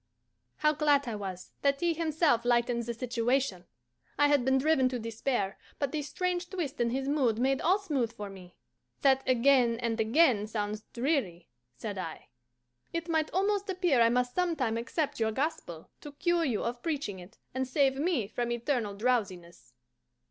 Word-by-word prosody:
How 300 0 +2
glad 290 -2 +2
I 235 - -2
was 190 -3 -6
that 280 0 +2
he 345 +1 +1
himself 315 -6 +1
lightened 240 -1 +1
the 235 - -2
situation! 240 -4 -1 0.5
I 290 +1 +4
had 290 -3 +3
been 265 +1 +3
driven 270 -2 +3
to 255 - -3
despair, 225 -2 -2 0.2
but 280 -2 -1
this 295 -2 -3
strange 360 -1 -2
twist 305 -9 -3
in 235 - +2
his 265 +3 -2
mood 265 -7 +2
made 265 +3 +1
all 365 +4 +4
smooth 285 - -1
for 210 -3 -7
me. 185 -2 -12 0.5
"That 270 -1 +4
'again 250 -2 +4
and 230 -1 -2
again' 225 -2 +3
sounds 210 -1 -3
dreary," 235 - -1 0.3
said 205 - -5
I. 165 -8 -7 0.6
"It 335 0 -4
might 320 -1 +1
almost 400 +2 0
appear 355 -9 +2
I 230 - +6
must 250 +1 +1
sometime 325 -11 0
accept 260 +6 -2
your 220 -1 +1
gospel, 220 - -4
to 295 - -10
cure 345 +2 +1
you 240 -7 -1
of 240 +1 -3
preaching 285 - -3
it, 180 +4 -14 0.2
and 260 0 -1
save 270 0 +2
me 300 - 0
from 240 +2 -3
eternal 240 -3 -1
drowsiness." 190 - -2
255 Hz, 170 wpm, -30 LUFS, 225-300 Hz, 0.6 s, I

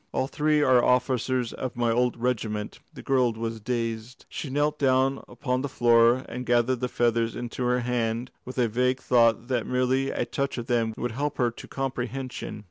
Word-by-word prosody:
"All - - +1
three 150 +2 +1
are 130 -3 +5
officers 125 -1 +1
of 130 - -5
my 120 -1 +1
old 125 +1 +1
regiment." 110 -3 -2
The - - -11
girl 125 -3 +2
was 115 0 -4
dazed. 115 +1 -4
She 145 - -5
knelt 150 +2 0
down 135 0 +2
upon 125 -2 -2
the 140 - -3
floor 120 +1 +4
and 125 +2 -5
gathered 120 +1 +2
the 125 0 -2
feathers 115 -2 +1
into 120 +1 -4
her 125 0 +2
hand 120 0 -1
with 130 - -9
a 125 -2 +3
vague 125 +3 +1
thought 115 -1 +3
that 125 -3 0
merely 130 +1 +1
to - - -1
touch 140 -1 -2
them 115 -2 -1
would 120 - -2
help 145 +5 -3
her 120 -3 +2
to - - -11
comprehension. 130 -3 -4
125 Hz, 185 wpm, -26 LUFS, 115-130 Hz, -, are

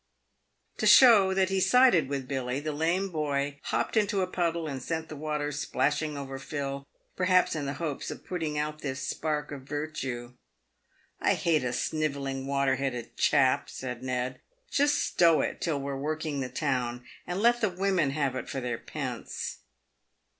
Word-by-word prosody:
To - - +1
show 220 -7 +8
that 190 -1 +2
he 190 0 +1
sided 190 - +5
with 135 -2 -3
Billy, 130 -1 -2
the 155 +1 -3
lame 170 +6 0
boy 145 -3 -1
hopped - - -1
into 205 -2 +2
a - - +2
puddle 170 -2 -1
and 135 -3 -4
sent 160 +4 -3
the 155 - -6
water 150 0 -2
splashing 150 +1 -1
over 135 -1 -6
Phil, 140 -1 -4 0.3
perhaps 185 -2 +3
in 145 -3 -3
the 140 - -3
hopes 155 -5 -4
of - - -8
putting 160 -5 -3
out 150 +1 -2
this 130 -2 -4
spark 150 -2 -2
of 140 -2 -6
virtue. 135 -4 -4 0.4
" - - -39
I - - +4
hate 160 -5 +1
a 125 - -1
snivelling, 140 -1 -2
water 140 -1 +1
headed 125 -3 -3
chap," 135 -3 +3
said 125 -2 -6
Ned. 130 0 -3
" - - -38
Just 290 +1 +3
stow 165 -2 +4
it - - -3
till 155 -4 0
we're 140 0 -3
working 150 +1 -2
the 130 -1 -3
town, 125 -3 -2 0.2
and 180 +2 -2
let 240 +2 +4
the 215 - +3
women 185 -4 +1
have 140 -2 -1
it 125 - -5
for 135 - -3
their 120 -2 -3
pence." - - -5
150 Hz, 175 wpm, -28 LUFS, 135-170 Hz, 0.4 s, show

